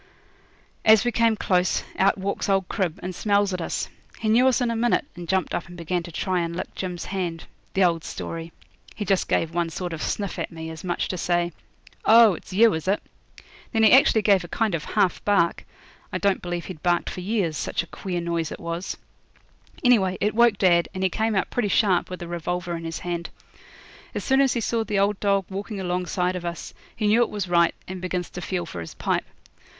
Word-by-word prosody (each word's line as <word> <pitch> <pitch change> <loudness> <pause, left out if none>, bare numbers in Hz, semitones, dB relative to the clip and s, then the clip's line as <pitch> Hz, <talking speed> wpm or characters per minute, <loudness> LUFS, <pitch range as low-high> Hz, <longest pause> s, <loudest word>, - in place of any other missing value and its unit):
As 220 +1 +6
we 240 - +2
came 230 -1 +3
close, 180 -3 +1
out 195 +1 +3
walks 195 +1 -2
old 195 -2 +2
Crib, 185 -6 -2
and 185 +1 -4
smells 200 +1 +1
at 180 - -2
us. - - -2 0.3
He 220 - -1
knew 245 +4 +5
us 260 - +3
in 245 -2 +1
a - - -1
minute, 240 +5 +2
and 175 -1 -8
jumped 190 -1 0
up - - -2
and 175 0 -11
began 175 +1 -1
to 170 - -9
try 185 +2 -1
and 170 0 -2
lick - - -5
Jim's 180 -2 -4
hand: 175 -4 -3 0.3
the 190 - +4
old 170 -2 +2
story. 165 0 -6 0.4
He 210 - -4
just 195 0 +1
gave 165 0 +1
one 170 -1 0
sort 175 +1 -4
of 160 - -5
sniff 200 -4 -2
at - - -3
me, 160 -1 -7
as 160 0 -9
much 175 -2 -1
as - - -3
to 185 - -2
say, 175 0 +1 0.5
'Oh! 225 -2 +7
it's 175 - -10
you, 220 +4 +5
is 160 +2 -4
it?' 200 +2 +1 0.7
Then 225 -2 +2
he 220 - +7
actually 240 -4 +6
gave 195 -2 +4
a - - -7
kind 220 +2 0
of 160 -3 -2
half 195 -5 +1
bark. 200 -5 +2 0.4
I - - -1
don't 200 -1 +1
believe 175 -1 -4
he'd 175 -5 -8
barked 175 -1 +1
for 180 - -6
years, 190 -5 0
such 150 - -2
a - - -10
queer 175 +1 -4
noise 170 -2 -2
it - - -6
was. 170 +2 -4 0.9
Anyhow, 205 -7 +4
it 210 0 +1
woke 235 0 +5
up - - -17
dad, 175 -3 +3
and 185 - -2
he 190 - +2
came 220 +2 0
out 195 - 0
pretty 240 -4 0
sharp 190 -2 +2
with 180 -1 -6
a - - -7
revolver 175 +1 -3
in 165 0 -6
his 165 -1 -4
hand. 170 -1 -3 0.9
As - - -2
soon 265 0 +3
as 270 -2 +3
he 235 - -1
saw 225 +1 0
the 210 -2 -2
old 200 0 +2
dog 200 -2 +2
walking 200 +2 -5
alongside 180 0 -1
of 180 - -4
us 170 -1 -5 0.2
he 215 - -2
knew 215 +3 +4
it 240 - +2
was 205 -3 -3
right, 170 -1 +3
and 185 -1 -6
begins 180 -1 -3
to 180 - -6
feel 175 -1 -2
for 85 - -7
his 80 - -9
pipe. - - -1
185 Hz, 230 wpm, -24 LUFS, 175-205 Hz, 0.9 s, Oh